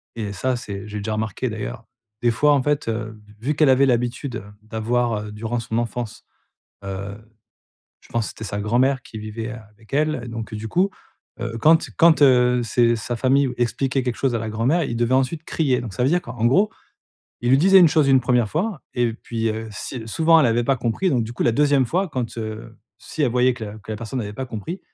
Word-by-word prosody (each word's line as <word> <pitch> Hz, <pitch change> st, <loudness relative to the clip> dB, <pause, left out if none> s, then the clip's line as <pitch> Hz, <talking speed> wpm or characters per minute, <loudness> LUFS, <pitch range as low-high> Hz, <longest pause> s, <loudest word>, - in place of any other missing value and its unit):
et 105 Hz, -3 st, -4 dB
ça, 130 Hz, +6 st, -1 dB
c'est 100 Hz, -5 st, -7 dB
j'ai 105 Hz, 0 st, -6 dB
déjà 105 Hz, +1 st, -3 dB
remarqué 110 Hz, +3 st, -2 dB
d'ailleurs, 110 Hz, +2 st, -6 dB, 0.4 s
des 120 Hz, -, +3 dB
fois 145 Hz, +6 st, +3 dB
en 140 Hz, -, +3 dB
fait, 145 Hz, -2 st, 0 dB
heu, 110 Hz, -1 st, -4 dB, 0.2 s
vu 140 Hz, +7 st, -1 dB
qu'elle 150 Hz, -1 st, +4 dB
avait 130 Hz, +1 st, +5 dB
l'habitude, 125 Hz, 0 st, -1 dB
heu, 105 Hz, -, -9 dB, 0.2 s
d'avoir, 115 Hz, +1 st, -1 dB
heu, -, -, -8 dB
durant 115 Hz, +3 st, -3 dB
son 115 Hz, 0 st, -3 dB
enfance, 120 Hz, -1 st, -4 dB, 0.6 s
heu, 100 Hz, +1 st, -5 dB, 0.8 s
je -, -, -21 dB
pense 115 Hz, -2 st, -1 dB
c'était 110 Hz, -, -8 dB
sa 100 Hz, -1 st, -3 dB
grand-mère 125 Hz, +5 st, +2 dB
qui 110 Hz, -, -9 dB
vivait, 110 Hz, +2 st, -5 dB
heu, -, -, -7 dB
avec 110 Hz, +3 st, -23 dB
elle 155 Hz, -1 st, +1 dB
et -, -, -8 dB
donc, 115 Hz, -1 st, -6 dB
heu, -, -, -3 dB
du 105 Hz, +1 st, -6 dB
coup, 180 Hz, -, +2 dB, 0.5 s
heu, 115 Hz, -1 st, -4 dB
quand 160 Hz, +6 st, +4 dB
quand, 165 Hz, -2 st, +6 dB
heu, 125 Hz, -2 st, +5 dB
c'est 120 Hz, 0 st, +2 dB
sa 120 Hz, +2 st, -4 dB
famille 135 Hz, +2 st, +2 dB
expliquait 130 Hz, +2 st, 0 dB
quelque 125 Hz, -2 st, -2 dB
chose 135 Hz, -3 st, 0 dB
à -, -, +1 dB
la 110 Hz, 0 st, -4 dB
grand-mère, 125 Hz, +11 st, +1 dB
ils 120 Hz, -4 st, -3 dB
devaient 120 Hz, +1 st, +1 dB
ensuite 135 Hz, +5 st, 0 dB
crier. 135 Hz, -7 st, 0 dB
Donc 115 Hz, -4 st, -6 dB
ça 125 Hz, -, -1 dB
veut -, -, +4 dB
dire 175 Hz, +4 st, +2 dB
qu'en 120 Hz, -1 st, -2 dB
gros, 195 Hz, -, +4 dB, 0.7 s
il 120 Hz, -, 0 dB
lui 135 Hz, -, +6 dB
disait 190 Hz, +5 st, +7 dB
une 170 Hz, -, +7 dB
chose 150 Hz, -2 st, +3 dB
une 135 Hz, -1 st, +5 dB
1re 125 Hz, -2 st, +2 dB
fois 175 Hz, -, -2 dB
et 120 Hz, -2 st, +1 dB
puis, 115 Hz, 0 st, -3 dB
heu, 110 Hz, +1 st, -4 dB
si 115 Hz, +3 st, -6 dB
souvent 165 Hz, +8 st, +4 dB
elle 145 Hz, -, +4 dB
avait 120 Hz, +1 st, +1 dB
pas 135 Hz, +2 st, +2 dB
compris, 125 Hz, +10 st, 0 dB
donc 120 Hz, -6 st, +1 dB
du 110 Hz, -, -7 dB
coup, 120 Hz, -, -2 dB
la 120 Hz, -, +3 dB
2e 145 Hz, +1 st, +3 dB
fois, 185 Hz, +10 st, 0 dB
quand, 125 Hz, -6 st, -4 dB
heu, 110 Hz, -1 st, -7 dB, 0.2 s
si 155 Hz, -, -5 dB
elle 135 Hz, -, +2 dB
voyait 125 Hz, 0 st, +3 dB
que 115 Hz, -2 st, -7 dB
la 105 Hz, +1 st, -8 dB
que 110 Hz, +1 st, -11 dB
la -, -, -4 dB
personne 115 Hz, +4 st, -4 dB
avait 105 Hz, -2 st, -5 dB
pas 130 Hz, +5 st, -5 dB
compris, 125 Hz, -, -6 dB
120 Hz, 235 wpm, -22 LUFS, 110-135 Hz, 0.8 s, disait